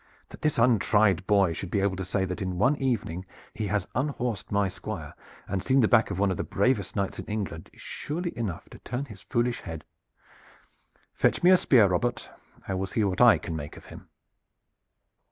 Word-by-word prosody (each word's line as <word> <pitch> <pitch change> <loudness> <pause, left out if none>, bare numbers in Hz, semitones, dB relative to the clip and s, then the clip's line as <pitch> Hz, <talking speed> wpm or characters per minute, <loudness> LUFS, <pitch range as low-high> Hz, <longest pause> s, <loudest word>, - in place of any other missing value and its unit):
"That - - -12
this 155 - +1
untried 105 -5 +3
boy 100 -5 +3
should 90 +2 -6
be 100 - 0
able 100 -1 +1
to 95 - -3
say 95 +1 -1
that 90 0 -5
in 95 -2 -3
one 125 +9 +3
evening 110 -10 -2 0.3
he 105 -1 -3
has 100 -2 -1
unhorsed 125 -5 -2
my 100 -1 +2
Squire, 90 - -6 0.3
and 95 -1 -2
seen 130 +6 +2
the 110 - +4
back 115 -1 +4
of 100 - -4
one 100 0 +2
of 90 - -2
the - - -2
bravest 100 -1 0
knights 100 -2 -2
in - - -6
England 100 -6 -5
is - - -17
surely 170 +4 -4
enough 105 -8 -4
to - - -12
turn 130 +3 -4
his 105 -8 -12
foolish 120 +1 -1
head. 80 -2 -7 1.3
Fetch - - +1
me 180 - +7
a - - +9
spear, 125 -10 +5
Robert! 100 +6 -1 0.4
I 95 - -2
will 95 +1 -2
see 110 +3 0
what 95 0 0
I 120 -2 +8
can 85 -6 -6
make 75 -2 -7
of - - -13
him." - - -13
100 Hz, 205 wpm, -27 LUFS, 95-120 Hz, 1.3 s, a